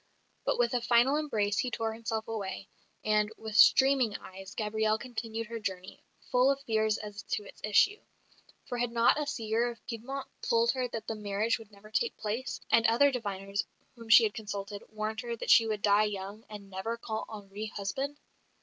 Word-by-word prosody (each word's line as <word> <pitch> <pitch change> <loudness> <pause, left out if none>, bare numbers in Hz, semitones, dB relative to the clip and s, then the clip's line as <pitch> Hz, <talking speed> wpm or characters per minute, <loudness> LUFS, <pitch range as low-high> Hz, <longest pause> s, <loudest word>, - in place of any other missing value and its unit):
But - - +1
with 240 0 +2
a 245 - +1
final 240 +4 +4
embrace 215 -10 0
he 250 - 0
tore 225 -2 -2
himself 225 -1 -3
away; 195 -3 -4 0.4
and 210 0 +2
with 220 -1 -7
streaming 265 -1 +6
eyes 190 +1 -11
Gabrielle 215 0 +1
continued 230 -2 -5
her 230 +1 -6
journey, 190 -3 -5 0.3
full 250 +2 +5
of 275 0 +1
fears 220 -3 +1
as 210 0 -7
to 210 - -1
its - - -14
issue; 295 - +4 0.7
for 245 -2 -3
had 240 -1 0
not 235 +5 +4
a 295 - -3
seer 230 -3 0
of 235 -2 -11
Piedmont 265 +4 -5
told 230 -1 +3
her 255 -1 -1
that 225 -2 -6
the - - -3
marriage 210 +2 -1
would 220 -2 -14
never 205 +1 -16
take 465 - 0
place; 225 +5 -3
and 230 0 +5
other 275 +5 +5
diviners, 200 -4 -3 0.3
whom 230 -2 -12
she 225 +1 +9
had 210 -2 +1
consulted, 205 -1 -5
warned 215 +1 -3
her 235 -1 -4
that - - -1
she 225 -2 +7
would 215 -2 -2
die 210 +1 +5
young, 205 +1 -5
and 200 -2 -10
never 190 +5 -3
call 220 -1 -4
Henri 210 0 -7
husband? 265 +8 -3
220 Hz, 190 wpm, -30 LUFS, 210-235 Hz, 0.7 s, she